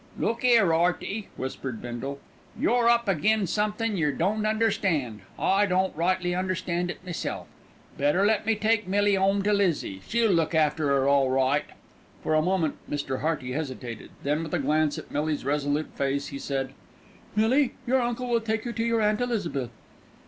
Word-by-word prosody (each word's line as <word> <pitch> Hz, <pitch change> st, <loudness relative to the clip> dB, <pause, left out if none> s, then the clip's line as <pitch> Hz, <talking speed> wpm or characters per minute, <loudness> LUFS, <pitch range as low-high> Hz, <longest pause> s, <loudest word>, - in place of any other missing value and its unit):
"Look 230 Hz, +2 st, -1 dB
'ere, 230 Hz, -9 st, +5 dB
'Earty," 180 Hz, +5 st, 0 dB
whispered 130 Hz, -3 st, -5 dB
Bindle, 120 Hz, +3 st, -5 dB, 0.4 s
"you're 240 Hz, -1 st, +3 dB
up 235 Hz, -1 st, +3 dB
agin' 205 Hz, +4 st, +2 dB
somethin' 210 Hz, +3 st, -1 dB
yer 150 Hz, -4 st, +2 dB
don't 205 Hz, +9 st, 0 dB
understand, 200 Hz, -, 0 dB, 0.2 s
I 200 Hz, +2 st, +2 dB
don't 185 Hz, 0 st, +1 dB
rightly 175 Hz, +2 st, 0 dB
understand 180 Hz, -1 st, -1 dB
it 175 Hz, -, -7 dB
meself. 175 Hz, -3 st, -4 dB, 0.5 s
Better 150 Hz, +8 st, +3 dB
let 215 Hz, -1 st, +2 dB
me 225 Hz, -, +3 dB
take 215 Hz, -1 st, +1 dB
Millie 205 Hz, +1 st, +3 dB
'ome 195 Hz, +1 st, +2 dB
to 210 Hz, +1 st, +2 dB
Lizzie, 170 Hz, -, 0 dB
she'll 230 Hz, -1 st, +2 dB
look 165 Hz, -2 st, +1 dB
after 155 Hz, -1 st, +2 dB
'er 135 Hz, -1 st, +2 dB
all 140 Hz, -1 st, +4 dB
right." 135 Hz, +2 st, +2 dB, 0.6 s
For -, -, 0 dB
a 155 Hz, -, +4 dB
moment 170 Hz, -3 st, 0 dB
Mr. 145 Hz, -3 st, -2 dB
Hearty 150 Hz, -5 st, -1 dB
hesitated; 130 Hz, -5 st, -5 dB
then 150 Hz, +3 st, 0 dB
with 165 Hz, +1 st, -3 dB
a -, -, +2 dB
glance 150 Hz, +1 st, +1 dB
at -, -, -9 dB
Millie's 150 Hz, -1 st, -1 dB
resolute 145 Hz, +1 st, 0 dB
face, 140 Hz, +1 st, -1 dB
he 140 Hz, -, -6 dB
said: 135 Hz, -1 st, -3 dB, 0.6 s
"Millie, 245 Hz, +5 st, +3 dB
your 260 Hz, +1 st, +2 dB
uncle 240 Hz, +1 st, -2 dB
will 235 Hz, -1 st, +1 dB
take 220 Hz, 0 st, -2 dB
you 240 Hz, -, -3 dB
to 225 Hz, -, -1 dB
your 230 Hz, -1 st, +1 dB
Aunt 210 Hz, +2 st, +2 dB
Elizabeth." 180 Hz, -, -2 dB
180 Hz, 170 wpm, -26 LUFS, 145-215 Hz, 0.6 s, ere